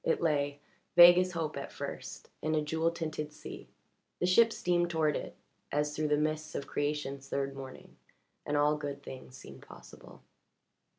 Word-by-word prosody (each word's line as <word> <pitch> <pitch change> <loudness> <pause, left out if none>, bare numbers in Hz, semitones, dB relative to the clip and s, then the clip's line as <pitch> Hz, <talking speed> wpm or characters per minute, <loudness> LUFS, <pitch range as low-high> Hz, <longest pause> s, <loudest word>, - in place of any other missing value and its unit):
It 165 - +1
lay, 145 -3 0 0.4
vague 175 +1 +10
as 185 0 0
hope 160 -3 -2
at - - -6
first, - - -7
in 155 +1 0
a 155 - +2
jewel 160 +2 +1
tinted 155 -3 -4
sea; - - -10 0.5
the - - 0
ship 225 +6 +5
steamed 175 -4 +1
toward 160 -3 +1
it - - -5 0.4
as 150 +1 0
through 155 0 0
the 150 0 +2
mists 155 0 -2
of 140 - -3
creation's 140 -2 -3
third 140 0 -2
morning, 135 -1 -10 0.5
and 145 - -1
all 150 +1 +3
good 140 -1 -5
things 130 -1 -10
seemed 70 - -12
possible. - - -14
150 Hz, 170 wpm, -31 LUFS, 145-165 Hz, 0.5 s, vague